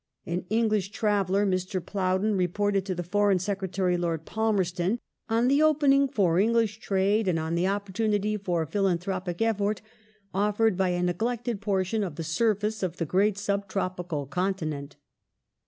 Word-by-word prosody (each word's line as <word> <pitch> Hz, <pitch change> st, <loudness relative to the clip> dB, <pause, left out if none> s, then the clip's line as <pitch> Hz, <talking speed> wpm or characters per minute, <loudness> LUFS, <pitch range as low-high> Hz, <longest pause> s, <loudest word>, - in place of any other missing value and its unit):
An 175 Hz, +2 st, -3 dB
English 215 Hz, -3 st, +1 dB
traveller, 205 Hz, -2 st, +1 dB
Mr. 185 Hz, 0 st, -1 dB
Plowden, 190 Hz, +2 st, 0 dB
reported 195 Hz, +2 st, 0 dB
to 185 Hz, -, -1 dB
the 175 Hz, -, -3 dB
Foreign 200 Hz, +2 st, +2 dB
Secretary, 190 Hz, -1 st, -1 dB
Lord 165 Hz, -2 st, -2 dB
Palmerston, 195 Hz, -2 st, 0 dB, 0.3 s
on 230 Hz, +2 st, +2 dB
the 280 Hz, +3 st, +4 dB
opening 280 Hz, -3 st, +4 dB
for 190 Hz, -10 st, +2 dB
English 225 Hz, 0 st, +2 dB
trade 200 Hz, 0 st, +1 dB
and 175 Hz, -3 st, +2 dB
on 160 Hz, +1 st, -2 dB
the 175 Hz, +2 st, +1 dB
opportunity 205 Hz, +1 st, 0 dB
for 180 Hz, -5 st, -1 dB
philan 195 Hz, +1 st, +1 dB
thropic 180 Hz, +1 st, -3 dB
effort 210 Hz, -2 st, 0 dB, 0.5 s
offered 210 Hz, +2 st, +2 dB
by 190 Hz, 0 st, +1 dB
a 175 Hz, 0 st, 0 dB
neglected 230 Hz, +5 st, -1 dB
portion 200 Hz, +1 st, 0 dB
of 175 Hz, -6 st, -4 dB
the 165 Hz, -, -4 dB
surface 210 Hz, +5 st, 0 dB
of 180 Hz, -2 st, -2 dB
the 165 Hz, -, -1 dB
great 195 Hz, +5 st, +2 dB
sub 200 Hz, 0 st, -1 dB
tropical 180 Hz, -6 st, -3 dB
continent. 155 Hz, -3 st, -3 dB
195 Hz, 155 wpm, -27 LUFS, 180-210 Hz, 0.5 s, the